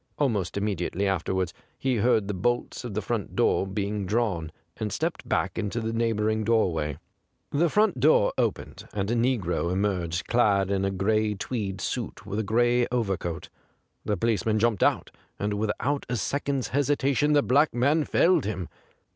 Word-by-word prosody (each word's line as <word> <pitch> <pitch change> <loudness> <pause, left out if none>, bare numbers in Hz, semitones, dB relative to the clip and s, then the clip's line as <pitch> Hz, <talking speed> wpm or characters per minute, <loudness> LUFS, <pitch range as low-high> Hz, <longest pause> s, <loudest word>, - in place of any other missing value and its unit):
Almost 105 -11 0
immediately 100 -1 -1
afterwards 95 -1 -1 0.2
he 130 -2 0
heard 110 -2 +2
the 105 - -2
bolts 120 +7 -1
of 120 -5 -6
the 110 - -1
front 110 0 -3
door 95 - +2
being 100 0 -2
drawn^ 100 -7 0 0.3
and 105 -1 -3
stepped 160 - -3
back 95 - 0
into 110 +2 -2
the 110 0 -3
neighbouring 110 -1 0
doorway. 85 -10 +1 0.5
The 165 +4 +2
front 210 - +2
door 140 -5 +4
opened, - - -2
and 100 +1 -1
a - - +1
negro 115 -8 0
emerged 90 -3 -1
clad 100 -5 +2
in 95 -1 +1
a - - +1
gray 105 +2 +1
tweed 100 -3 -4
suit 110 -3 -4
with 100 +2 -3
a - - 0
gray 120 +3 +2
overcoat. 95 -8 -2 0.5
The 105 - -1
police 110 -1 +1
man 110 -1 +1
jumped 110 -2 +1
out, - - +2 0.3
and 105 0 -1
without 110 +7 -1
a 125 - 0
second's 140 +4 -1
hesitation 145 +1 +2
the 145 -1 +4
black 145 +4 +3
man 145 +6 +2
felled 175 - +3
him. 95 -4 -3
110 Hz, 165 wpm, -26 LUFS, 95-120 Hz, 0.5 s, door